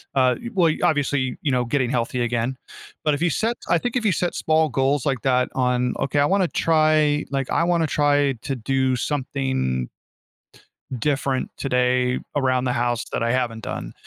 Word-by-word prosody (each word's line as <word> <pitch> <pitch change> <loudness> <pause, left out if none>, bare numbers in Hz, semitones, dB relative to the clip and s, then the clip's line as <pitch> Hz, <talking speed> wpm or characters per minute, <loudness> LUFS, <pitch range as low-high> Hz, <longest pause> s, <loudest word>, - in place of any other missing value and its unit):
uh, 130 -1 +3
y 235 - -5
well, 170 -4 +4
obviously, 140 -4 +1
you 145 - 0
know, 125 -1 +1
getting 125 0 0
healthy 125 0 -1
again. 120 +2 -1 0.5
But 150 - +3
if 145 - -7
you 175 - +3
set 230 +2 -1
I - - +4
think 245 0 -3
if 235 - -2
you 205 - +4
set 175 +1 -1
small 160 0 +2
goals 135 +1 0
like 135 -4 0
that 125 -1 +2
on, 125 -1 +1
"Okay, 140 +2 0
I 145 - +4
want 195 +5 +2
to - - +1
try" 155 -2 +2
like, 135 -2 -2
"I - - +2
want 175 -1 +2
to 160 - +1
try 145 -2 +2
to 135 - -2
do 130 +1 0
something" 130 - -2 1.1
"different 140 -1 -1
today 125 -1 +1 0.2
around 130 -2 +1
the 125 - 0
house 120 -1 -1
that - - -1
I 115 - 0
haven't 120 -3 -1
done." - - -5
135 Hz, 190 wpm, -22 LUFS, 125-150 Hz, 1.1 s, well